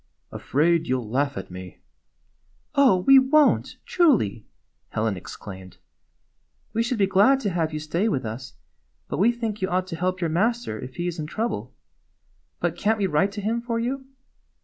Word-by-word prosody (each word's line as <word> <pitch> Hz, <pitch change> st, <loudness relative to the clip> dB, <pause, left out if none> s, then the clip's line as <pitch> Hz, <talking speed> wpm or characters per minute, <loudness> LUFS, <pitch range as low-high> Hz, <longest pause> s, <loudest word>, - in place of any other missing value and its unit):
"Afraid 165 Hz, +3 st, +1 dB
you 130 Hz, -, +1 dB
'll 115 Hz, -, -7 dB
laugh 140 Hz, +5 st, -1 dB
at 95 Hz, -, -7 dB
me." 90 Hz, -2 st, -9 dB, 1.0 s
"Oh, 270 Hz, -9 st, +5 dB
we 270 Hz, +7 st, +7 dB
won't, 285 Hz, +3 st, +3 dB
truly!" 205 Hz, -, +2 dB, 0.4 s
Helen 110 Hz, -2 st, -1 dB
exclaimed. 95 Hz, 0 st, -10 dB, 0.5 s
" -, -, -45 dB
We 230 Hz, -, +1 dB
should 240 Hz, +1 st, -1 dB
be 200 Hz, -, +4 dB
glad 200 Hz, +8 st, +4 dB
to 205 Hz, -, -1 dB
have 165 Hz, -3 st, -1 dB
you 155 Hz, -, -3 dB
stay 170 Hz, +8 st, -1 dB
with 130 Hz, -, -1 dB
us, 120 Hz, +3 st, -6 dB, 0.5 s
but -, -, -4 dB
we 220 Hz, +5 st, +5 dB
think 225 Hz, -3 st, -4 dB
you 190 Hz, -, 0 dB
ought 185 Hz, +1 st, 0 dB
to 185 Hz, -2 st, -6 dB
help 180 Hz, +2 st, -1 dB
your 170 Hz, -3 st, -1 dB
master 220 Hz, -, 0 dB
if 130 Hz, -, -8 dB
he 175 Hz, -, -3 dB
is 175 Hz, -1 st, -3 dB
in 150 Hz, -, -4 dB
trouble. 225 Hz, +8 st, -3 dB, 0.8 s
But -, -, -1 dB
can't 220 Hz, +1 st, +1 dB
we 205 Hz, -, 0 dB
write 190 Hz, +3 st, +2 dB
to 205 Hz, -, -5 dB
him 225 Hz, +3 st, -1 dB
for 235 Hz, -1 st, -2 dB
you?" 260 Hz, +3 st, -3 dB
185 Hz, 185 wpm, -24 LUFS, 140-230 Hz, 1.0 s, we